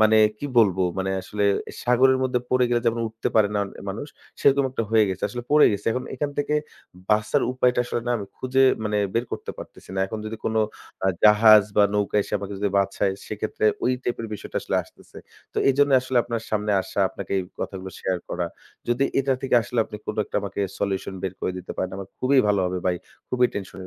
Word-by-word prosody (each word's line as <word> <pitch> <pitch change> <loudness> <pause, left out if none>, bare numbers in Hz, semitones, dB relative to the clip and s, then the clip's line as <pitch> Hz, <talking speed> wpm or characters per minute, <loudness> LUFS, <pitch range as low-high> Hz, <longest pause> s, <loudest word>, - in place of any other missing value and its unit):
মানে 110 0 +6 0.2
কী 145 - -4
বলব? 100 -5 +5 0.2
মানে 95 0 -1
আসলে 105 +2 -2 0.4
সাগরের 130 +2 +4
মধ্যে 125 -1 +1
পড়ে 130 -1 +4
গেলে 120 -1 +2
যেমন 115 0 +1
উঠতে 110 +1 -3
পারে 105 -2 +5
না - - +1
অন - - -8 0.2
মানুষ, 130 +9 -6 0.3
সেরকম 140 0 +4
একটা 120 - -2
হয়ে 110 -1 +5
গেছে। 95 -1 -4
আসলে 120 -1 -6
পড়ে 150 0 +7
গেছি। 100 0 -4
এখন 130 +1 -3
এখান 145 +2 -2
থেকে 145 +1 0 0.6
বাঁচার 105 +7 +2
উপায়টা 125 -1 +2
আসলে 120 - -2
না - - 0
আমি 100 -2 -6
খুঁজে 130 +1 +1 0.2
মানে 105 -1 0 0.2
বের 115 +1 +1
করতে - - -4
পারতেছি - - -11
না। 95 - -1
এখন 110 +2 -5
যদি 110 +1 -5
কোনো 110 0 +1 0.4
আ - - +3 0.2
জাহাজ 105 0 +8
বা 105 - +7
নৌকা 105 0 0
এসে - - -12
আমাকে 100 0 -6
যদি 100 0 +1
বাঁচায় 100 0 +1
সেক্ষেত্রে 110 0 -2 0.2
ওই 130 - +3
টাইপের 115 -2 -3
বিষয়টা - - -8
আসলে - - -1
আসতেছে। - - -16 0.3
তো - - -2
এজন্যই 140 -1 +4
আসলে 130 0 -3
আপনার 115 -1 -3
সামনে 105 -1 0
আসা, 100 - -3
আপনাকে - - -7
এই 95 - -1 0.2
কথাগুলো 95 -1 -5
শেয়ার 95 -1 -1
করা। 90 -1 -2 0.4
যদি 120 +3 +2 0.2
এটা 135 0 +1
থেকে 135 - +1
আসলে 120 - -4
আপনি 105 - -8
কোনো - - -4
একটা - - -4
আমাকে 100 0 -4 0.2
solution 95 -1 -2
বের 95 -1 -3
করে 90 - -1
দিতে 90 - -7
পারেন 95 - -2
আমার 95 0 -7
খুবই 135 +2 +3
ভালো 100 -2 +3
হবে 90 0 -2
ভাই, 90 -1 +2 0.3
খুবই 125 -1 +3
tension 95 -1 -6
এ 95 - -8
110 Hz, 215 wpm, -24 LUFS, 100-125 Hz, 0.6 s, জাহাজ